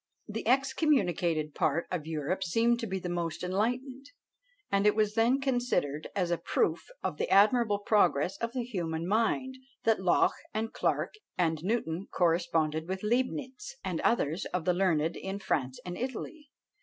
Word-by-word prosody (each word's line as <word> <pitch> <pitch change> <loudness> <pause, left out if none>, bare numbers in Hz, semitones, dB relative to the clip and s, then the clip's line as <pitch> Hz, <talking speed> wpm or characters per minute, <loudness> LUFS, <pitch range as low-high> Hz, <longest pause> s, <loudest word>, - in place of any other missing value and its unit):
The 220 0 -5
excommunicated 225 - +2
part 155 +3 +1
of 165 -4 -3
Europe 160 +4 -2
seemed 230 +6 +2
to 230 - -3
be 190 -1 -2
the 180 - -5
most 170 -2 -3
enlightened, 250 +8 -2 0.6
and 200 +1 +3
it 210 - +4
was 215 -1 +2
then 235 +4 +3
considered 245 - 0
as 180 -3 0
a 175 - +1
proof - - 0 0.2
of - - -2
the - - -1
admirable 210 +1 +5
progress 200 -5 +2
of 230 0 -3
the 255 -2 -1
human 170 -8 -3
mind, 230 +5 +1 0.3
that 225 -3 +2
Locke 180 -2 +3 0.2
and 225 +1 -2
Clarke - - 0 0.2
and 160 -3 +1
Newton 190 -4 -1
corresponded 165 -2 +1
with 190 +1 -3
Leibnitz, 260 - -2
and - - -2
others 170 -7 +1
of 180 -3 -3
the 180 - +3
learned 170 -3 +1
in 195 +1 -4
France 130 -9 -2
and 180 0 -4
Italy. 265 - -5
195 Hz, 160 wpm, -30 LUFS, 170-235 Hz, 0.6 s, admirable